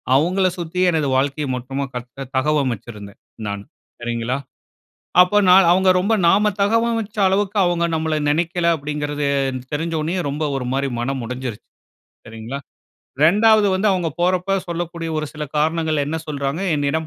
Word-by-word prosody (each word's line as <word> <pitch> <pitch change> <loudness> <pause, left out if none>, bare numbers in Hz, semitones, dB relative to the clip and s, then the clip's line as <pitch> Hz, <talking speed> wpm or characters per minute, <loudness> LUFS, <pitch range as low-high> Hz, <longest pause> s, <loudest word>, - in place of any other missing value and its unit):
அவுங்கள 185 +7 +2
சுத்தி, 170 +1 -4
எனது 155 -3 0
வாழ்க்கைய 140 +2 -1
மொத்தமா 135 +3 -4
கட்டுனே 125 +2 -7
தகவமைச்சிருந்தேன், 120 -8 -2 0.3
நான். 100 0 -4 0.4
சரிங்களா? 120 +2 -2 0.9
அப்ப 205 +3 +3
நான் 185 +1 +7
அவுங்க 185 +1 +4
ரொம்ப 200 +5 0 0.2
நாம 210 +4 +4
தகவமைச்ச 225 0 0
அளவுக்கு, 200 +2 0
அவுங்க 175 -1 +1
நம்மள 160 0 -1 0.2
நெனக்கல, 170 +3 0
அப்படிங்கிறது 145 0 -3 0.5
தெரிஞ்ச 165 +3 -2
ஒடனேயே, 170 +4 -1
ரொம்ப 150 +3 -2
ஒரு 125 -2 -3
மாரி 140 +1 0
மனம் 130 +1 -2
உடைஞ்சிருச்சு. 125 -2 -6 0.6
சரிங்களா? 115 +4 -7 0.7
ரெண்டாவது 210 +5 +5
வந்து, 190 +3 0
அவுங்க 180 -3 0
போறப்ப 185 +2 +1
சொல்லக்கூடிய 170 -1 -4
ஒரு 155 - -2
சில 150 - -7
காரணங்கள், 155 0 +1
என்ன 155 +3 -2
சொல்றாங்க, 140 +1 -3
"என்னிடம் 145 +2 -1
155 Hz, 135 wpm, -20 LUFS, 135-180 Hz, 0.9 s, நான்